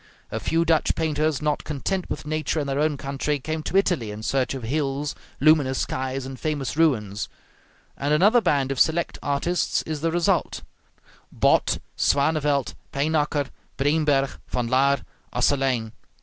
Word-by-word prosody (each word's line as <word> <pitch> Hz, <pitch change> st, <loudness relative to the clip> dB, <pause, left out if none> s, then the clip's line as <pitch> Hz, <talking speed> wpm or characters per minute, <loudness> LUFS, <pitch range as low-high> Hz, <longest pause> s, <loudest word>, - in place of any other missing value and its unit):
A -, -, -2 dB
few 165 Hz, +1 st, +1 dB
Dutch 165 Hz, -2 st, +2 dB
painters, 155 Hz, -2 st, 0 dB
not 150 Hz, -1 st, 0 dB
content 175 Hz, +6 st, -3 dB
with -, -, -4 dB
nature 155 Hz, +1 st, -1 dB
in 145 Hz, -, -1 dB
their 140 Hz, 0 st, -1 dB
own 150 Hz, -1 st, +1 dB
country, 140 Hz, +2 st, -2 dB
came 155 Hz, +3 st, -4 dB
to 185 Hz, -, -1 dB
Italy 175 Hz, -, +1 dB
in 105 Hz, +1 st, -7 dB
search 135 Hz, +2 st, 0 dB
of 130 Hz, -, -6 dB
hills, 140 Hz, +3 st, -1 dB, 0.3 s
luminous 145 Hz, -3 st, +4 dB
skies, 130 Hz, 0 st, -2 dB
and 130 Hz, -1 st, -7 dB
famous 145 Hz, -5 st, -2 dB
ruins; 110 Hz, -11 st, +1 dB, 0.7 s
and 140 Hz, +1 st, -2 dB
another 205 Hz, +10 st, +5 dB
band 140 Hz, -8 st, +1 dB
of 135 Hz, -, -2 dB
select 165 Hz, +1 st, +2 dB
artists 145 Hz, +5 st, 0 dB
is 155 Hz, -2 st, -4 dB
the 165 Hz, 0 st, +1 dB
result, 175 Hz, 0 st, 0 dB, 0.7 s
Both, -, -, +2 dB, 0.2 s
Swanevelt, 145 Hz, -1 st, +1 dB, 0.2 s
Pynacker, 145 Hz, -1 st, 0 dB, 0.3 s
Breenberg, 145 Hz, -1 st, +1 dB
Van 125 Hz, -1 st, -1 dB
Laer, 135 Hz, +3 st, +2 dB, 0.3 s
Asselyn. 130 Hz, -5 st, +1 dB
145 Hz, 150 wpm, -24 LUFS, 135-155 Hz, 0.7 s, another